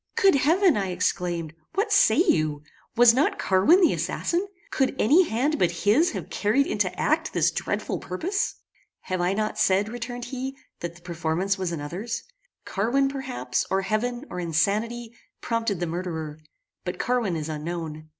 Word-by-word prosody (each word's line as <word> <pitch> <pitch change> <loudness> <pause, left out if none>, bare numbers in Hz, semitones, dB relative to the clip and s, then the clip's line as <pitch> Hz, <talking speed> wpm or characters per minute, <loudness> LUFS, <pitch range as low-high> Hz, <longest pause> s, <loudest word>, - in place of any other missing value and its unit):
"Good 390 -1 +5
heaven!" 330 - +4
I 195 -2 0
exclaimed, 175 -3 -1 0.2
"what 415 +2 +1
say 310 - +5
you? 155 - +2 0.3
Was 235 0 +7
not 270 +5 +2
Carwin 200 - +4
the 345 - +5
assassin? 355 +4 -1 0.2
Could 265 -1 +1
any 325 - +4
hand 280 +7 0
but 175 +1 0
his 270 +12 +5
have - - -6
carried 225 +7 +2
into 205 -7 0
act 315 +1 +1
this - - +3
dreadful - - -2
purpose?" 355 - -2 0.5
"Have 185 -1 -3
I 180 +2 +1
not 215 +1 -2
said," 200 +1 +3
returned 245 +1 -5
he, 265 +1 -5 0.2
"that 170 0 -5
the 175 - -16
performance 175 +3 -1
was 185 -2 -2
another's? 175 +10 -4 0.4
Carwin, 260 +7 +1
perhaps, 265 -2 -2
or 195 0 +1
heaven, 240 +6 -1
or 180 - -4
insanity, 210 +8 -1 0.3
prompted 230 -5 -1
the 175 - -1
murderer; 160 -3 -4 0.4
but 180 - -4
Carwin 240 -8 0
is 155 -1 -3
unknown. 155 0 -5
215 Hz, 160 wpm, -25 LUFS, 175-265 Hz, 0.5 s, Was